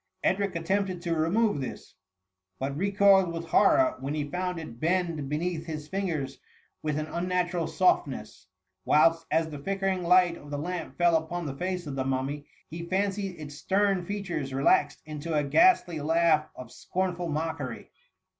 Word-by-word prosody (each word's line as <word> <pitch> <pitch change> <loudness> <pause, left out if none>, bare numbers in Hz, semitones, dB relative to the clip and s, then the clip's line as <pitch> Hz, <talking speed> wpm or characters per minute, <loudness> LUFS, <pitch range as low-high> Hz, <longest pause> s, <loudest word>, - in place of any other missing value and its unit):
Edric 195 -1 +1
attempted 185 +2 -1
to 170 -2 0
remove 190 +6 +2
this^ 135 -2 -6 0.6
but 135 +1 -3
recoiled 195 0 +4
with 165 0 -5
horror, 320 - +4
when 140 +3 -3
lie 150 -1 -2
found 180 0 -2
it 120 -8 -9
bend 165 -4 0
beneath 165 +2 -2
his 155 -2 -5
fingers 160 -8 -3 0.4
with 150 -1 -1
«a 155 0 -4
unnatural 175 -1 0
softness; 135 - 0 0.4
whilst, 165 - +3
as 160 0 +1
the 145 - -6
flickering 195 +3 -1
light 180 0 +4
of 145 - -13
the 145 - -3
lamp 170 +2 -5
fell 175 -1 +4
upon 160 +2 -2
the 140 -2 -4
face 180 +2 -3
of 140 -2 -5
the 135 - -1
mummy, 135 +2 -2 0.2
he 165 +2 -7
fancied 195 -1 -1
its 145 -2 -8
stem 195 +3 +1
features 175 -8 -4
relaxed 140 +1 +2
into 155 +1 -4
a 150 - +2
ghastly 180 - +4
laugh, 160 0 +2
of 125 -2 -10
scorn* 185 -1 -2
ful 175 -1 -4
mockery. 155 -3 -4
170 Hz, 165 wpm, -28 LUFS, 150-185 Hz, 0.6 s, recoiled